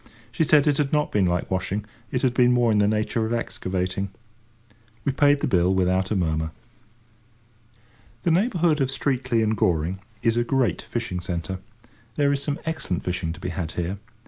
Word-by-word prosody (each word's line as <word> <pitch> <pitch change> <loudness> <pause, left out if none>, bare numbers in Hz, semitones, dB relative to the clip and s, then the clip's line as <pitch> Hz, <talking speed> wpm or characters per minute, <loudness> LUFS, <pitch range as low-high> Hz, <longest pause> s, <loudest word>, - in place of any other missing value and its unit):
She 160 - +1
said 150 -1 +5
it 145 -2 +3
had 145 -2 0
not 150 -1 +1
been 100 -3 +2
like 90 +1 -1
washing, 95 +3 -1 0.3
it 125 - -1
had 130 -2 +3
been 125 0 +4
more 120 -2 +3
in 105 - +3
the 105 - +4
nature 110 +2 0
of 115 - -2
excavating. 95 -5 -2 1.0
We - - +2
paid 145 +1 +3
the - - +1
bill 90 +1 +3
without 95 +1 +1
a 110 - 0
murmur. 80 -3 0 1.7
The 170 - +2
neighbourhood 175 - +2
of 130 - +2
Streatley 130 -4 0
and 110 0 +1
Goring 90 -1 +1 0.2
is 115 0 +2
a 120 - +3
great 120 - +1
fishing 115 -6 -3
centre. 90 0 -4 0.6
There 145 -1 +3
is 140 - -1
some 145 0 -2
excellent 160 - -2
fishing 90 -2 -2
to 90 - -12
be 90 - -4
had 80 -2 -4
here. 90 +3 -3
110 Hz, 185 wpm, -24 LUFS, 90-135 Hz, 1.7 s, said